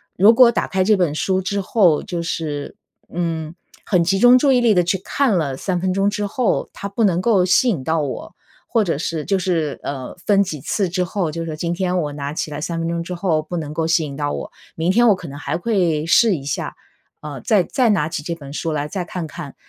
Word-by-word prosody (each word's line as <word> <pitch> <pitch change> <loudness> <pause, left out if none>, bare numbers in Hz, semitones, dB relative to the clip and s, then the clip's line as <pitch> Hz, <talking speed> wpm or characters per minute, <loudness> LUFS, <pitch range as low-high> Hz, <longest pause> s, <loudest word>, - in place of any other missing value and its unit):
如 205 +5 +6
果 240 0 +7
打 235 - 0
开 190 -1 -1
这 215 - +5
本 175 -6 +1
书 190 +4 0
之 200 +2 -2
后， 185 -5 +3
就 170 -2 -4
是， 150 -3 -4 0.4
嗯， 165 -2 -3 0.3
很 180 -4 +2
集 190 +3 +1
中 245 +4 +7
注 275 +1 +3
意 250 - +3
力 230 -3 +4
地 180 - +4
去 175 +3 0
看 240 -5 +1
了 140 -5 -1
3 180 +1 -2
分 185 0 0
钟 195 +1 +2
之 210 0 -2
后， 230 +3 0
它 200 - -6
不 210 +3 -1
能 180 -4 +3
够 195 -2 +3
吸 185 +7 +3
引 175 - 0
到 160 +3 0
我， 140 -3 -5 0.3
或 230 - +2
者 165 -5 -1
是 160 -1 -3
就 195 - +1
是， 165 -6 -1
呃， 135 -2 -5
分 200 -1 +4
几 155 -8 -3
次 195 +5 -1
之 180 +1 -1
后， 180 -2 -2
就 165 +1 -4
是 155 -2 -5
今 170 +2 -2
天 180 0 0
我 150 -3 -3
拿 145 0 -4
起 155 - -3
来 145 0 -6
3 170 0 -3
分 165 - -2
钟 170 0 -2
之 180 - -6
后 170 -3 0
不 175 +3 -5
能 150 -2 -5
够 160 +1 -1
吸 165 -1 +2
引 140 - -7
到 145 0 -2
我， - - -5 0.2
明 165 +2 -1
天 240 +6 +4
我 205 - +5
可 180 -2 -9
能 140 0 -8
还 145 +1 -3
会 175 -6 0
试 205 +3 +4
一 135 - -9
下， 140 - -3 0.5
呃， 145 -5 -7
再 205 - +3
再 245 +6 +1
拿 185 -8 +2
起 160 -1 -4
这 170 +1 -3
本 140 -3 -10
书 165 +1 -2
来 150 -1 -2
再 180 +3 -4
看 175 0 -5
看， 150 -2 -9
175 Hz, 260 characters per minute, -20 LUFS, 155-195 Hz, 0.5 s, 果